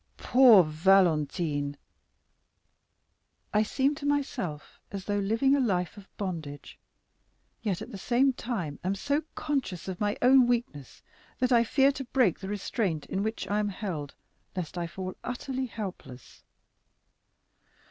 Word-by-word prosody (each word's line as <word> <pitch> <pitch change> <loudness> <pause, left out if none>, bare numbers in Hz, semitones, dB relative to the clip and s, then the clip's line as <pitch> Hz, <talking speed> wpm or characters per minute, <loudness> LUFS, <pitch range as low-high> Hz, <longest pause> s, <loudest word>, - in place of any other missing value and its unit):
"Poor 245 -7 +7
Valentine!" 155 -3 +2 1.8
"I 210 - +4
seem 265 +6 +1
to - - -5
myself 230 - -2
as 195 -1 -6
though 205 0 0
living 225 +8 +2
a - - +1
life 180 -9 0
of 200 -2 -13
bondage, 160 -7 -6 0.8
yet 200 -6 -2
at - - -10
the 200 - -7
same 255 +6 +2
time 190 - -4
am 190 +2 0
so 285 +9 0
conscious 260 - -2
of 185 0 -5
my 205 0 0
own 255 0 +6
weakness 230 - -3 0.3
that 255 0 0
I 235 -1 +6
fear 270 +4 +3
to 275 -1 -6
break 245 - +2
the 190 - -6
restraint 200 - -2
in 190 - -2
which 220 +2 -3
I 205 +1 0
am 210 -1 0
held, 180 -8 -5 0.4
lest 180 -3 -4
I 175 -1 -2
fall 185 +1 -6
utterly 260 +1 -3
helpless. 190 - -8
200 Hz, 140 wpm, -28 LUFS, 175-245 Hz, 1.8 s, Poor